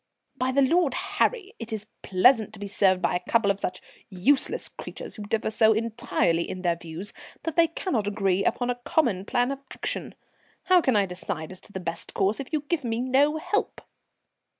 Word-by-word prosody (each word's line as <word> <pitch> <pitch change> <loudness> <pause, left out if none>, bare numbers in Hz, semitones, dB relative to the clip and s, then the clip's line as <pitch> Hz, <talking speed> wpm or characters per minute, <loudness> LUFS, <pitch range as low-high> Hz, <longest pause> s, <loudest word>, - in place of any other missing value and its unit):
"By 260 0 0
the 275 +1 +4
Lord 315 -1 +3
Harry, 405 +1 0
it's 220 -3 -4 0.2
pleasant 215 +3 +4
to 215 - -9
be 205 - -5
served 190 -2 +3
by - - +2
a 180 - -4
couple 225 -4 +4
of 200 - -4
such 185 -1 -4 0.3
useless 245 +9 +1
creatures - - -8
who 215 - -9
differ 215 +1 -1
so 220 0 +5
entirely 220 -6 0
in 185 0 -6
their 170 -1 +2
views 170 +4 -7 0.3
that 325 -2 -3
they 335 -1 +5
cannot 270 - -2
agree 195 -2 +1
upon 245 +3 +1
a 245 0 -6
common 230 -13 +1
plan 245 +4 +1
of 275 - -4
action. - - -4 0.5
How 370 -1 +5
can 260 -7 +2
I 205 -1 +4
decide 180 -3 -5
as 185 - -8
to - - -15
the 190 - -5
best 170 -2 -5
course 200 +3 +1
if 275 - -6
you 310 -2 0
give 300 +1 -2
me 230 -1 -1
no 270 +5 +3
help?" 415 +7 -1
225 Hz, 195 wpm, -26 LUFS, 195-275 Hz, 0.5 s, so